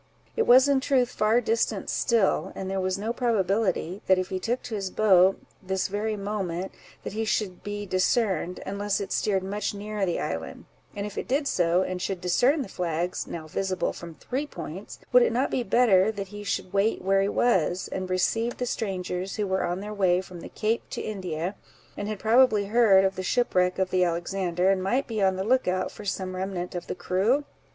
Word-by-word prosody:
It 455 - +1
was 255 +3 +7
in 280 -1 +3
truth 260 -2 +1
far 215 +3 +2
distant 225 0 0
still; 230 -5 +1
and 190 - -5
there 195 0 -1
was 185 0 -1
no 220 +4 -2
probability 200 -5 0
that 190 - +5
if 185 0 -2
he 185 - -2
took 240 +6 -2
to 230 - -7
his 195 -3 -2
boat, 190 -2 +4 0.2
this 190 0 -2
very 210 +2 -2
moment, 195 -3 -3 0.3
that - - -5
he 220 +1 -1
should 210 -4 -1
be 205 0 -5
discerned, 185 -1 0
unless 200 +1 -1
it 200 - -5
steered 195 -3 +1
much 205 +2 -3
nearer 210 0 -4
the 175 -3 0
island; - - -5 0.3
and 205 0 -3
if 210 - -5
it - - -5
did 280 +2 0
so, 175 -2 +2
and 185 -1 -4
should 190 0 -2
discern 245 - +2
the - - -8
flags, 175 -1 -2
now 160 -2 -6
visible 185 +2 -1
from 170 -2 -9
three 270 - -4
points, 175 - -8 0.2
would 250 - +8
it - - +3
not 250 +4 0
be 255 - 0
better 215 -3 +4
that 200 -3 -6
he 205 0 -8
should 195 -2 -3
wait 200 +1 +1
where 195 +1 +3
he 195 - +1
was, 185 -7 +1
and 185 -1 -4
receive 225 +6 0
the 250 - -2
strangers, 190 -4 -3
who 210 - -1
were 190 -1 0
on 175 +2 -2
their 210 +1 -6
way 185 -3 +3
from 185 -1 -9
the - - -9
Cape 225 +2 -1
to - - -4
India, 185 -4 -3 0.4
and 205 - -4
had 215 0 -3
probably 220 -1 +4
heard 200 -3 +5
of 190 - 0
the 185 - -3
shipwreck 180 -3 +1
of 190 -1 0
the 185 -1 +3
Alexander, 180 +1 0
and 190 -1 +1
might 240 +9 0
be 220 -4 -3
on 190 -1 +3
the 190 - -2
look 255 +3 +2
out 185 0 0
for 210 - -11
some 185 -1 -3
remnant 185 -1 -4
of 175 - -5
the - - -3
crew? 215 +12 +1
195 Hz, 210 wpm, -26 LUFS, 185-220 Hz, 0.4 s, would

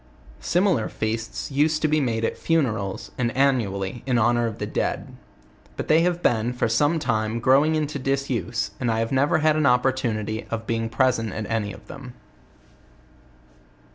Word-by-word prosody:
Similar 180 - +1
feasts 110 +4 -4
used 155 +3 +1
to - - +4
be 155 0 +2
made 115 -4 0
at - - -2
funerals, 115 - -1
and 120 -2 +1
annually, 115 -6 0
in 125 -2 +2
honor 120 +1 +2
of 110 - -5
the - - -3
dead; - - -3 0.6
but - - -5
they 160 +2 +5
have 175 0 0
been, 120 +1 +1
for 125 - 0
some 145 +9 +2
time, 110 -6 -1
growing 140 +6 +4
into 150 -2 -2
disuse, 130 -6 -2
and 125 - -1
I 115 0 0
never 140 +4 +3
had 155 -1 +4
an 155 -2 +2
opportunity 125 -4 0
of 115 -1 -4
being 115 0 -1
present 115 -3 +1
at 110 - -4
any 105 -3 -1
of 85 - -12
them. 125 -3 -10
125 Hz, 165 wpm, -24 LUFS, 115-140 Hz, 0.6 s, they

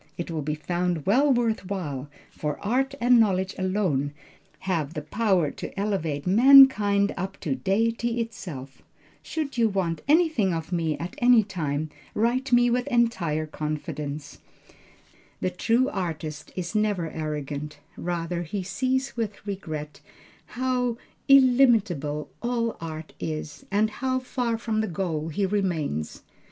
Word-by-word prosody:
It 170 0 -4
will 160 -2 -2
be 150 +1 -2
found 175 0 -2
well 270 +9 +4
worth 230 -6 +1
while, 145 -8 -4 0.2
for 150 -1 -3
art 265 +5 +1
and 245 0 +5
knowledge 190 -3 +2
alone 185 -8 0 0.5
have 165 -5 -2
the 150 - -4
power 185 -3 +1
to - - -7
elevate 165 -8 -1
mankind 210 -2 +7
up 190 +2 -5
to 145 - -1
Deity 230 - 0
itself. 165 - -6 0.4
Should 285 -6 -4
you 225 -1 +4
want 175 -5 -1
anything 300 - +3
of 165 +2 -5
me 165 -3 0
at 170 +2 -5
any 245 -2 +6
time, 155 -6 -3 0.2
write 250 +5 +1
me 245 0 +5
with 245 +1 0
entire 185 -11 +1
confidence. 150 -1 -5 1.0
The 185 - -1
true 235 +8 +2
artist 155 - -4
is 180 0 -4
never 205 -6 0
arrogant; 150 -1 -4 0.2
rather 170 0 -3
he 190 +3 -4
sees 260 +7 -1
with 215 -4 -4
regret 155 -7 -5 0.6
how 250 -2 0 0.3
illimitable 225 - +4
all 235 -1 -1
art 160 -1 -7
is, 155 -1 -5
and 210 +2 +2
how 260 +3 -1
far 250 -2 -2
from 220 -1 -1
the 220 - -1
goal 165 -4 -2
he 180 +5 -1
remains. 170 - -2
190 Hz, 135 wpm, -26 LUFS, 155-230 Hz, 1.0 s, mankind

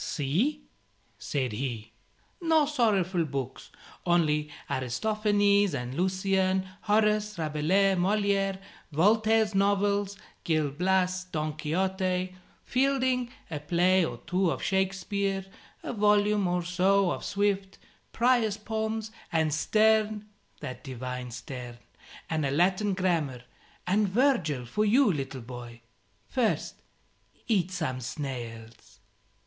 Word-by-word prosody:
"See," 210 - -1 0.6
said 130 -4 -2
he, 115 -1 -4 0.5
"no 320 -3 +4
sorrowful 200 - +1
books, 135 -4 -5 0.3
only 155 -4 +2 0.2
Aristophanes 205 - +1
and 125 -1 -4
Lucian, 190 +2 +1
Horace, 210 -1 +2
Rabelais, 165 +5 +2
Moliere, 195 +1 +1 0.3
Voltaire's 215 +6 +3
novels, 200 0 +1 0.3
'Gil 155 -3 +1
Blas,' 185 +3 +1
'Don 155 -4 -3
Quixote,' 185 +3 -1 0.3
Fielding, 255 -1 +1 0.2
a 150 - -3
play 180 +4 +3
or - - -3
two 185 0 +1
of - - -3
Shakespeare, 195 0 -1 0.4
a - - -4
volume 210 -2 +3
or 180 0 0
so 185 +2 +2
of - - -4
Swift, 200 -1 -1 0.3
Prior's 235 -3 +2
Poems, 220 0 -3 0.2
and 160 -2 +1
Sterne 215 +3 +2 0.4
that 130 - -7
divine 125 -2 -5
Sterne! 125 0 -8 0.5
And 160 -1 -1
a 140 - +1
Latin 185 +7 +2
Grammar 160 -10 0 0.4
and 200 +2 +2
Virgil 185 - +1
for 210 - -1
you, 220 0 +4
little 135 -3 -4
boy. 120 -1 -9 0.5
First, 245 -4 -1 0.7
eat 190 -6 +2
some 155 -9 -3
snails." 115 -5 -7
185 Hz, 110 wpm, -28 LUFS, 150-210 Hz, 0.7 s, no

